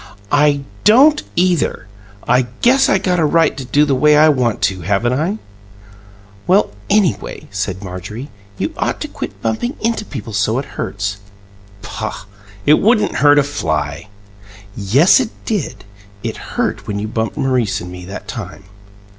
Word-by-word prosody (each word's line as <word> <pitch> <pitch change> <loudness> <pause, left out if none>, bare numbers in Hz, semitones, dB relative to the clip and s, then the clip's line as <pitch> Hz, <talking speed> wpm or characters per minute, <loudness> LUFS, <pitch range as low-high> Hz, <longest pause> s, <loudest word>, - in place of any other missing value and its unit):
"I 145 -1 +3 0.2
don't 270 +9 +6
either! 175 -9 +1 0.4
I 125 +1 +3 0.2
guess 265 +3 +5
I - - +4
got 180 -2 0
a - - +2
right 165 +2 +3
to 135 - -6
do 145 +4 +2
the 140 - +1
way 150 +3 +4
I 155 +1 +6
want 125 -6 0
to, 95 -2 0
haven't 100 +7 0
I?" 165 +10 -1 1.1
"Well, 195 +3 +3 0.2
anyway," 195 - 0
said 100 -1 -3
Marjorie, 100 +9 -7 0.3
"you - - -2
ought - - -1
to - - -3
quit - - -7
bumping 115 - -1
into 230 -1 -1
people 115 - -7
so 105 +3 +1
it 135 - -2
hurts." 100 +1 -3 0.7
"Poh! - - -5 0.4
It 150 +1 +5
wouldn't 215 -1 +2
hurt 145 0 +5
a 145 - +5
fly!" 80 - -3 0.7
"Yes, 120 - +4
it 250 -4 -1 0.2
did. 205 - -3 0.4
It - - -3 0.2
hurt - - -1
when 100 - -3
you 105 +1 -3
bumped 110 0 -3
Maurice 130 -6 0
and 90 +1 -8
me 90 0 -9
that 100 +3 -8
time." 100 - -7
135 Hz, 160 wpm, -17 LUFS, -, 1.1 s, don't